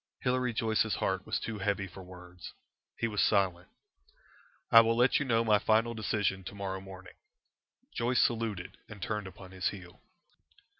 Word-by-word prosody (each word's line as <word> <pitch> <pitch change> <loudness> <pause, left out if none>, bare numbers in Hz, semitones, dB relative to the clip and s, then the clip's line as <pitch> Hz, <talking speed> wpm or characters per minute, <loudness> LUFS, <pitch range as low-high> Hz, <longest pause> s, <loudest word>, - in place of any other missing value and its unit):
Hilary 125 -1 +1
Joyce's 110 -1 +1
heart 95 -1 -2
was - - -1
too 110 -2 -5
heavy 100 0 -1
for 95 +1 -11
words. 90 0 -11 0.4
He 115 - 0
was 105 -2 -1
silent. 95 -4 +1 1.0
"I 115 - +10
will 115 0 +1
let 125 +2 +4
you 145 - -1
know 115 -3 +2
my 105 -2 +4
final 115 +2 +2
decision 105 -3 -1
to 100 - -7
morrow 95 -1 -4
morning." 95 -1 -11 0.8
Joyce 120 +1 +1
saluted 110 -6 -1
and 110 -2 -10
turned 105 +1 -3
upon 95 0 -12
his 95 0 -2
heel." 90 -3 -11
100 Hz, 160 wpm, -31 LUFS, 95-115 Hz, 1.0 s, I